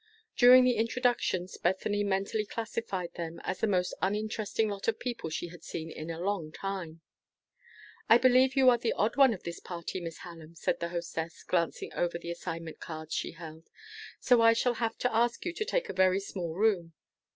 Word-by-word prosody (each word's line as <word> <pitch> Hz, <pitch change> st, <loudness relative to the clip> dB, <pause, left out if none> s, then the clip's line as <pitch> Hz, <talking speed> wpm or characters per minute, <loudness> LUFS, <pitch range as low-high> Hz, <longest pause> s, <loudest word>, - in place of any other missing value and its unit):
During 255 Hz, +1 st, +8 dB
the 250 Hz, -1 st, +3 dB
introductions, 225 Hz, -6 st, 0 dB
Bethany 205 Hz, +3 st, 0 dB
mentally 200 Hz, +2 st, 0 dB
classified 205 Hz, -5 st, -4 dB
them 170 Hz, -1 st, -6 dB
as -, -, -3 dB
the 225 Hz, -, +1 dB
most 180 Hz, -3 st, +1 dB
uninteresting 215 Hz, +2 st, -1 dB
lot 200 Hz, -1 st, -5 dB
of 225 Hz, -1 st, +1 dB
people 240 Hz, -9 st, -4 dB
she 170 Hz, +2 st, -4 dB
had 170 Hz, -1 st, -12 dB
seen 160 Hz, 0 st, -6 dB
in 155 Hz, +1 st, -7 dB
a 165 Hz, 0 st, -5 dB
long 180 Hz, -4 st, -2 dB
time. 175 Hz, -4 st, -5 dB, 1.1 s
"I 230 Hz, -, +9 dB
believe 255 Hz, +2 st, +4 dB
you 265 Hz, -1 st, +5 dB
are 240 Hz, -, +2 dB
the 235 Hz, -, 0 dB
odd 215 Hz, +3 st, 0 dB
one 275 Hz, -3 st, +6 dB
of 200 Hz, -, -5 dB
this 170 Hz, 0 st, -6 dB
party, 175 Hz, +1 st, -6 dB
Miss 165 Hz, -2 st, -6 dB
Hallam," 165 Hz, -2 st, -11 dB
said -, -, -1 dB
the 170 Hz, -, -3 dB
hostess, 170 Hz, -1 st, -5 dB
glancing 170 Hz, -2 st, -1 dB
over 175 Hz, -1 st, -1 dB
the 170 Hz, 0 st, -6 dB
assignment 165 Hz, -1 st, -6 dB
cards 160 Hz, -1 st, -7 dB
she -, -, -2 dB
held; 165 Hz, -1 st, -11 dB, 0.5 s
"so 245 Hz, -2 st, +4 dB
I 230 Hz, 0 st, +7 dB
shall 240 Hz, +2 st, +1 dB
have 225 Hz, -1 st, -1 dB
to 250 Hz, -2 st, -1 dB
ask 235 Hz, +6 st, +1 dB
you 350 Hz, -, -2 dB
to 430 Hz, -, -2 dB
take -, -, -1 dB
a -, -, -5 dB
very 185 Hz, 0 st, +3 dB
small 175 Hz, -4 st, -5 dB
room. 190 Hz, -5 st, +1 dB
190 Hz, 195 wpm, -30 LUFS, 170-230 Hz, 1.1 s, I